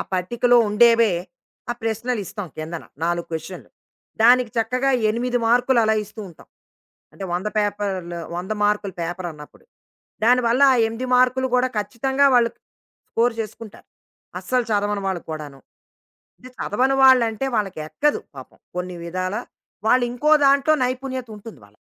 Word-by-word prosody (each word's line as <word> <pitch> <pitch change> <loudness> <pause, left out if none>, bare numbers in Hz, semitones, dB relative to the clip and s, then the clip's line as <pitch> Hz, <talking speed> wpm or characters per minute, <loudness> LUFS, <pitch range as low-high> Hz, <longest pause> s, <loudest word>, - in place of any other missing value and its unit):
పట్టికలో 240 +7 +2
ఉండేవే, 230 0 +4 0.6
ఆ - - +2
ప్రశ్నలిస్తాం 220 -3 -3
కిందన 160 +1 -6 0.2
4 170 0 -1
క్వశ్చన్‌లు. 160 +3 -7 0.5
దానికి 245 0 +5
చక్కగా 250 +4 +1 0.2
8 245 +2 -1
మార్క్‌లు 245 +1 +3
అలా 220 0 +2
ఇస్తూ 210 +2 -11
ఉంటాం. 165 - -17 0.6
అంటే 195 - -8
100 185 +4 -2
పేపర్‌లు, 200 -4 -2 0.2
100 185 +4 -4
మార్కుల 205 -2 0
పేపరన్నప్పుడు. 170 - -7 0.6
దానివల్ల 245 +1 +3
ఆ - - +3
8 235 +3 -5
మార్క్‌లు 255 +1 +3
కూడా, 255 +1 +2
ఖచ్చితంగా 265 +6 +1
వాళ్ళు 235 -1 +4 0.6
స్కోర్ 235 0 +1
చేసుకుంటారు. 215 -1 -9 0.5
అస్సలు 250 -1 0
చదవని 205 -1 0
వాళ్ళు 185 -3 -3
కూడాను. 145 -3 -7 0.8
అంటే 255 - -13
చదవని 260 +6 +1
వాళ్ళంటే, 255 -2 +4
వాళ్ళకి 195 -6 -2
ఎక్కదు 295 - 0 0.2
పాపం - - -12 0.2
కొన్ని 180 0 -4
విధాల 185 +3 -3 0.5
వాళ్ళు 250 +1 +4
ఇంకో 295 +5 0 0.2
దాంట్లో 280 +3 +4
నైపుణ్యతుంటుంది 250 - -5
వాళ్ళకి. 100 0 -22
225 Hz, 125 wpm, -22 LUFS, 185-250 Hz, 0.8 s, దానికి